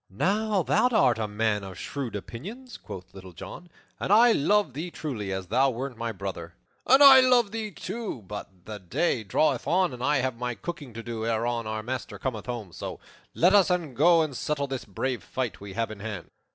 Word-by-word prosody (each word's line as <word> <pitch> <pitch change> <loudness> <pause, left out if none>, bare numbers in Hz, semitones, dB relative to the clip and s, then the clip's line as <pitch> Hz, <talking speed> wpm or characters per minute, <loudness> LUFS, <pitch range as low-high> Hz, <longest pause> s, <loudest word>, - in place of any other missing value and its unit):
"Now 200 - +1
thou 250 - +3
art 135 - +3
a 110 - -1
man 105 0 0
of 95 -2 -8
shrewd 135 -2 -5
opinions," 200 - -8
quoth 90 -1 -10
Little 95 -2 -11
John, 175 - -10 0.3
"and - - -2
I 230 +3 +7
love 205 - +2
thee 160 +6 -4
truly 120 - -5
as 95 0 -3
thou 135 +9 +3
wert 130 +1 -4
my 115 0 -3
brother." 95 -5 -6 0.3
"And 265 +3 +7
I 270 -1 +11
love 250 -5 +4
thee, 220 -1 -3
too. 200 - -6
But 95 -2 -9
the 105 -1 -7
day 110 - 0
draweth 135 +6 +1
on, 180 -4 +2
and 125 0 -7
I 150 +2 +3
have 130 -2 -1
my 125 -1 -2
cooking 145 -1 -7
to 115 - -6
do 115 -1 -4
ere 115 0 0
our 110 -2 -2
master 130 +3 -5
cometh 125 -5 -4
home; 115 -7 -5
so - - -7 0.4
let 180 +4 +4
us 200 -2 +6
e'en 175 -6 -1
go 165 +5 +5
and 150 -4 -4
settle 145 +2 -1
this 135 -2 -5
brave 125 +5 -3
fight 130 -6 -4
we 100 -1 -8
have 115 +1 -2
in 105 - -9
hand." 105 -4 -6
125 Hz, 205 wpm, -27 LUFS, 110-175 Hz, 0.4 s, I